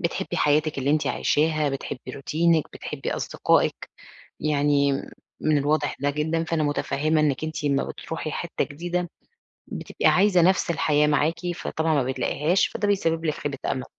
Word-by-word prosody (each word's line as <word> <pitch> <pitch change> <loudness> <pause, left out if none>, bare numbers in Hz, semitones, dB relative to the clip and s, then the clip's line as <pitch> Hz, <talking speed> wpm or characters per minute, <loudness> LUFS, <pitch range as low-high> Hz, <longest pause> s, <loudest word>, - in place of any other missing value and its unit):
بتحبّي 170 -3 -2
حياتِك 150 0 +2
اللي 135 +1 0
أنتِ 155 0 +1
عايشاها، 155 0 +1
بتحبّي 135 -2 -5
روتينِك، 160 +3 +1
بتحبّي - - -5
أصدقائِك. - - 0 0.5
يعني 145 -1 +2 0.5
من 155 -1 +2
الواضح 145 +1 0
ده 140 +1 +1
جدًا، 155 +3 -1
فأنا 165 -1 -1
متفهّمة 150 +1 0
إنِك 145 -1 +1
أنتِ 155 -1 -4
أمّا 140 -1 +2
بتروحي 160 -1 -5
حِتّة 170 - -2
جديدة 175 +4 -3 0.6
بتبقي - - -4
عايزة 190 -1 +5
نَفْس 185 0 +3
الحياة 150 -2 +2
معاكِ، 150 +2 +2 0.2
فطبعًا 160 -1 -1
ما 140 - +3
بتلاقيهاش، 145 +7 +1
فده 205 - -2
بيسبّب 165 -5 +1
لِك 155 -2 0
خيبة 140 -2 -4
أمل. 130 - -2
155 Hz, 150 wpm, -24 LUFS, 145-165 Hz, 0.6 s, عايزة